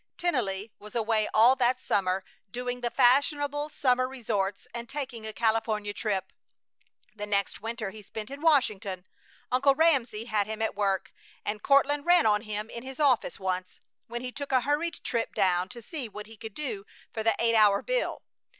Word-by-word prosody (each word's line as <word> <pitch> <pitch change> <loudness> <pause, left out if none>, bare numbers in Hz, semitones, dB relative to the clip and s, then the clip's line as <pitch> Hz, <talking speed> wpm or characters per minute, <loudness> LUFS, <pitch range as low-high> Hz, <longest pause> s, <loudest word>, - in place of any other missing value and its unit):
Tennelly 225 - -1
was 210 +3 -12
away 220 -2 +1
all 235 +4 +6
that 250 0 +2
summer, 190 -5 0 0.3
doing 245 +3 -4
the 240 - 0
fashionable 290 +4 +3
summer 255 -3 +2
resorts 210 -7 -2
and 235 0 -6
taking 255 -6 -5
a - - -4
California 220 -2 0
trip. 195 -4 -2 0.8
The 210 -1 -6
next 200 -1 -1
winter 225 -2 -4
he 215 - -11
spent 215 +3 -8
in 280 +1 -7
Washington. 215 - +2 0.5
Uncle 270 +2 +4
Ramsey 260 -9 +2
had 215 -3 0
him 220 0 -5
at 220 - 0
work, 195 -2 -1 0.3
and 210 0 -3
Courtland 285 +2 +3
ran 350 -1 +6
on 210 -1 +4
him 215 -1 -4
in 235 - -6
his 265 +2 -9
office 260 - +2
once, 185 -1 -3 0.3
when 240 +1 -5
he 250 - -4
took 285 +2 -6
a 260 -1 +4
hurried 295 +6 -1
trip 230 -2 -2
down 180 0 +2
to 240 -2 -9
see 270 -3 -6
what 210 +1 -8
he 225 +1 -13
could 220 -1 -9
do 240 -10 -4 0.3
for 220 - -3
the 225 +1 +2
eight 230 0 +2
hour 210 -3 +5
bill. - - -1
230 Hz, 180 wpm, -28 LUFS, 210-265 Hz, 0.8 s, all